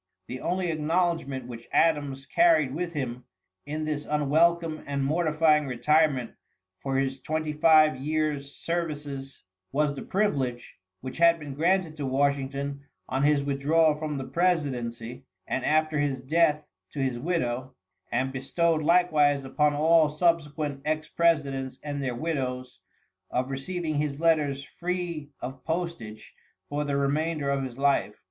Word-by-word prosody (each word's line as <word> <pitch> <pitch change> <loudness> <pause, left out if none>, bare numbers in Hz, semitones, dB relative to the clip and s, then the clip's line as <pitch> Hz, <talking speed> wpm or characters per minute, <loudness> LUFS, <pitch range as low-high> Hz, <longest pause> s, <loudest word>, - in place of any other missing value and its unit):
The 125 +5 -7
only 180 0 -1
acknowledgment 155 -4 0
which 120 -1 -10
Adams 145 -4 +1
carried 155 -1 +3
with 170 +2 -3
him, 125 -4 -4 0.4
in 155 +1 -3
this 150 -1 -2
unwelcome 155 +2 +2
and 140 -1 -1
mortifying 155 -1 +2
retirement 135 0 +2 0.5
for 135 -1 -2
his 135 0 -1
twenty 155 +2 -2
five 155 -2 +5
years' 150 0 -2
services 145 -5 -4 0.3
was 150 +1 +1
the 140 - -7
privilege, 135 - -1 0.2
which 130 +4 -7
had 170 0 +6
been 150 -3 -7
granted 170 +2 +1
to 140 -2 -3
Washington 140 +1 -1 0.3
on 135 +1 -1
his 145 0 +3
withdrawal 150 +3 +3
from 150 -1 -4
the 135 - -3
presidency, 130 -6 -1 0.2
and 130 - -2
after 155 0 +2
his 140 -3 0
death 150 +3 +2 0.3
to - - -10
his 130 -3 -1
widow, 130 -5 -2 0.4
and 130 +2 0
bestowed 160 +5 +1
likewise 150 -4 +3
upon 150 +2 +1
all 160 +1 +4
subsequent 150 -3 0
ex 155 0 -2
presidents 140 -6 +1
and 145 -1 -4
their 125 -2 -2
widows, 130 -4 -3 0.5
of 130 +2 -1
receiving 155 +2 -3
his 145 -1 -2
letters 150 -4 +2
free 170 -2 -4
of 130 0 -7
postage 160 -11 -4 0.4
for 145 +1 -1
the 140 -1 -1
remainder 145 +1 0
of 140 -1 0
his 130 -2 -6
life. 140 -6 +1
145 Hz, 140 wpm, -27 LUFS, 135-160 Hz, 0.5 s, had